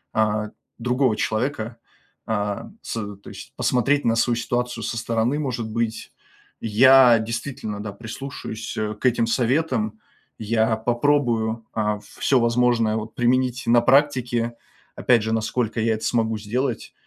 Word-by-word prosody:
э, 105 Hz, -1 st, +1 dB, 0.3 s
другого 125 Hz, 0 st, +1 dB
человека. 110 Hz, +2 st, -2 dB, 0.5 s
Э, 105 Hz, -2 st, -2 dB, 0.2 s
с -, -, -6 dB, 0.2 s
то 100 Hz, -, -13 dB
есть -, -, -11 dB
посмотреть 140 Hz, +4 st, +1 dB
на 115 Hz, -, +3 dB
свою 115 Hz, +1 st, +2 dB
ситуацию 120 Hz, 0 st, -2 dB
со 115 Hz, -, -3 dB
стороны, 115 Hz, +5 st, 0 dB
может 125 Hz, -6 st, -3 dB
быть. 115 Hz, -1 st, -3 dB, 0.5 s
Я 125 Hz, +2 st, +6 dB
действительно, 110 Hz, -1 st, -4 dB
да, 105 Hz, -1 st, -6 dB
прислушаюсь, 110 Hz, 0 st, -7 dB
э, 105 Hz, 0 st, -2 dB
к 105 Hz, -, -9 dB
этим 120 Hz, -2 st, +3 dB
советам. 120 Hz, -3 st, 0 dB, 0.4 s
Я 110 Hz, +1 st, +1 dB
попробую, 120 Hz, -2 st, 0 dB
э, 105 Hz, -1 st, 0 dB, 0.2 s
всё 135 Hz, -, +3 dB
возможное, 120 Hz, -2 st, +2 dB
вот, 110 Hz, 0 st, -5 dB
применить 125 Hz, +1 st, +1 dB
на 120 Hz, 0 st, +5 dB
практике. 125 Hz, -3 st, +2 dB, 0.4 s
Опять 120 Hz, -3 st, +3 dB
же, 110 Hz, -, -2 dB
насколько 115 Hz, +1 st, -1 dB
я 115 Hz, 0 st, +2 dB
это 110 Hz, -, -8 dB
смогу 110 Hz, -2 st, +1 dB
сделать. 120 Hz, +3 st, -3 dB
115 Hz, 135 wpm, -23 LUFS, 110-125 Hz, 0.5 s, Я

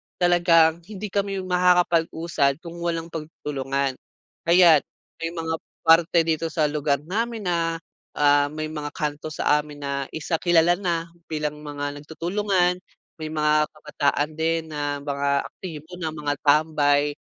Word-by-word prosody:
talagang 170 Hz, -2 st, +4 dB
hindi 210 Hz, -1 st, -7 dB
kami 195 Hz, -1 st, -1 dB
makakapag-usad 170 Hz, -5 st, +2 dB
kung 170 Hz, 0 st, -8 dB
walang 170 Hz, -1 st, -3 dB
pagtutulungan. 140 Hz, -4 st, -3 dB, 0.5 s
Ayan, 170 Hz, -3 st, +7 dB, 0.4 s
may 165 Hz, 0 st, -3 dB
mga 160 Hz, -1 st, -2 dB, 0.3 s
parte 165 Hz, +1 st, +5 dB
dito 160 Hz, 0 st, 0 dB
sa 155 Hz, -2 st, 0 dB
lugar 145 Hz, -1 st, 0 dB
namin 225 Hz, +6 st, -2 dB
na, 165 Hz, -1 st, -1 dB, 0.3 s
ah, 145 Hz, 0 st, +4 dB
may 155 Hz, +1 st, -5 dB
mga 145 Hz, -1 st, -6 dB
kanto 150 Hz, 0 st, -3 dB
sa 150 Hz, -1 st, +2 dB
amin 150 Hz, -1 st, -8 dB
na 140 Hz, -, -2 dB, 0.2 s
isa 160 Hz, +1 st, -2 dB
kilala 175 Hz, 0 st, +3 dB
na 170 Hz, -3 st, -2 dB, 0.2 s
bilang 150 Hz, -1 st, -3 dB
mga 145 Hz, -1 st, -5 dB
nagtutulungan, 180 Hz, +4 st, 0 dB, 0.4 s
may 155 Hz, -, -4 dB
mga 150 Hz, -1 st, +2 dB
kabataan 150 Hz, -1 st, -1 dB
din 160 Hz, 0 st, 0 dB
na 145 Hz, -1 st, -3 dB
mga 140 Hz, -1 st, 0 dB
aktibo 170 Hz, 0 st, -9 dB
na 160 Hz, -2 st, -3 dB
mga 145 Hz, -1 st, -1 dB
tambay, 145 Hz, -1 st, +3 dB
160 Hz, 135 wpm, -24 LUFS, 150-170 Hz, 0.5 s, Ayan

